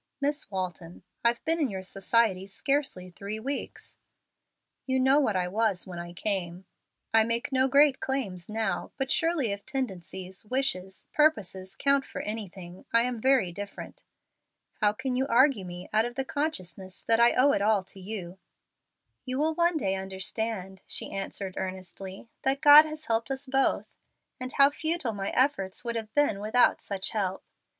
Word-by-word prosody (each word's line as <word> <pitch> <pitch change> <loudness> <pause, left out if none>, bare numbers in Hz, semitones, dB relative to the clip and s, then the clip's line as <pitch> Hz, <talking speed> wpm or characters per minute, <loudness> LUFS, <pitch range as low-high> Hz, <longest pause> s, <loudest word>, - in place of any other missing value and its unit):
Miss 285 -4 -1
Walton, 180 -3 -5 0.2
I've 235 0 +1
been 330 +1 +2
in 290 -5 +1
your 190 -2 -5
society 195 0 +1
scarcely 235 -5 -1
three 200 +4 -5
weeks. 275 +5 -5 0.9
You 260 0 +1
know 265 +3 +5
what 220 -9 +1
I 180 -1 +1
was 205 -1 0
when 180 -2 -7
I 175 0 -7
came. 180 -1 -3 0.5
I 225 0 +6
make 230 +4 -2
no 260 0 +3
great 280 0 +5
claims 205 -11 -2
now, 215 -5 -2
but 270 -1 -2
surely 325 -9 +1
if 200 0 -5
tendencies, 190 - -4
wishes, 210 -6 -2
purposes 195 - +1
count 280 0 +2
for - - -6
anything, 190 -4 -7
I 230 0 +5
am 245 -2 -3
very 260 -8 +3
different. 200 +3 -8 0.8
How 210 -2 +4
can 255 +4 -3
you 265 +2 0
argue 255 -4 +4
me 175 0 -8
out 220 +1 +4
of 240 0 -5
the 270 0 -2
consciousness 190 - -4
that 225 0 +3
I 235 0 +6
owe 280 +3 +5
it 200 - +1
all 205 -1 +3
to 190 +1 -8
you?" 190 -2 -7 0.8
"You 255 0 -3
will 310 +3 +1
one 340 0 +2
day 195 -10 0
understand," 190 +1 -3
she - - 0
answered, 195 -1 -4
earnestly, 190 +2 -6
"that 270 +1 +1
God 300 0 +10
has 310 0 -7
helped 225 +2 0
us 270 +1 -3
both, 270 0 +1 0.5
and 255 0 -4
how 280 0 +6
futile 315 -5 -1
my 195 -1 -3
efforts 245 -6 +1
would 235 0 -2
have 220 -1 -4
been 290 -9 +3
without 220 +4 +3
such 195 -1 -2
help. 195 -4 -2
220 Hz, 170 wpm, -28 LUFS, 190-270 Hz, 0.9 s, God